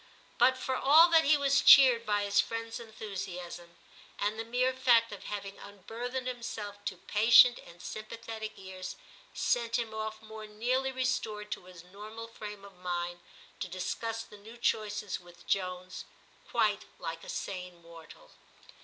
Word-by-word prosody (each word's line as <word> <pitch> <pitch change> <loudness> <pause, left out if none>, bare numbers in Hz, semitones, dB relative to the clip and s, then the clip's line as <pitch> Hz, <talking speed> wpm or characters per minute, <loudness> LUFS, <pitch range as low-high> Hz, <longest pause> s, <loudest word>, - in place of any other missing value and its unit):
But 260 +2 +5
for 260 0 -2
all 310 +6 +7
that 325 -1 +5
he 300 +1 +5
was 275 0 +3
cheered 245 -4 +8
by 205 -1 +1
his 205 +1 +3
friend's 230 +1 -5
enthusiasm; 180 -6 -7 0.4
and 210 +2 -1
the - - -1
mere 250 +3 +1
fact 240 -3 +4
of 205 - -9
having 200 -1 -6
unburthened 230 +6 -6
himself 215 -5 -6
to 185 - -3
patient 230 +5 +6
and 170 - -15
sympathetic 220 0 -6
ears 190 -1 -7 0.4
sent 235 -1 +1
him 230 -2 -3
off 220 0 -4
more 220 0 -9
nearly 250 +5 -1
restored 220 -5 -2
to - - -5
his 180 -2 -13
normal 210 +5 -9
frame 210 -3 -9
of 200 -1 -14
mind, 175 -1 -3 0.4
to - - -3
dis 180 0 -3
cuss 225 0 -4
the 210 - -14
new 225 +4 -12
choices 210 -3 -1
with 175 -1 -17
Jones, 185 -1 -2 0.4
quite 215 -4 +1
like 165 -1 -6
a - - -10
sane 180 -2 -5
mortal. 165 -2 -15
215 Hz, 155 wpm, -31 LUFS, 190-235 Hz, 0.4 s, cheered